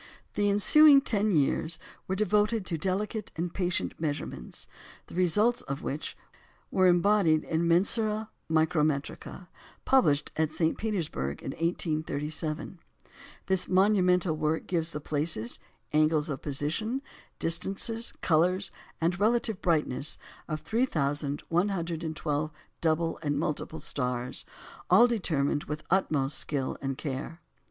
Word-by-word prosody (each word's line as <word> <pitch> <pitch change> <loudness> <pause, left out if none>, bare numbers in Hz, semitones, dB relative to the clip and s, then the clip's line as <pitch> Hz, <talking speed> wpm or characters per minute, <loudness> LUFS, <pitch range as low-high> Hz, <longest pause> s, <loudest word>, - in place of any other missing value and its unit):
The 205 0 +1
ensuing 280 +8 +7
ten 215 -5 +1
years 160 0 +2 0.3
were 190 - -1
devoted 210 +1 +1
to 170 - -2
delicate 200 +4 -2
and 170 +1 -3
patient 180 -2 -1
measurements, 145 - -4 0.4
the - - -14
results 210 +7 +2
of 140 +1 -5
which 145 +3 -4 0.5
were 185 -1 +4
embodied 175 -3 +4
in 165 +1 0
Mensuræ 215 +5 +2 0.2
Micrometricæ, 155 +1 0 0.4
published 155 - +3
at 160 -1 +1
St. 160 +1 +1
Petersburg 160 - -3
in - - -3
1837. 155 0 -2 0.7
This 190 -1 0
monumental 185 -3 +3
work 155 +1 -1
gives 170 -3 -1
the 150 - -5
places, 145 -6 -1 0.3
angles 155 0 +3
of 140 - -4
position, 165 - -2 0.3
distances, 195 +7 -1
colours, 180 +4 +2 0.3
and 170 +2 0
relative 220 -1 +1
brightness 155 -5 +1 0.3
of 155 -1 -3
3,112 160 - -1 0.3
double 165 0 +1
and 145 -2 -1
multiple 155 +1 -2
stars, 125 -2 -2 0.4
all 235 - +8
determined 155 - 0
with 150 +1 -4
the - - -30
utmost 150 -7 +1
skill 140 -3 -2
and 135 -1 -3
care. 145 +3 -5
165 Hz, 115 wpm, -29 LUFS, 150-195 Hz, 0.7 s, all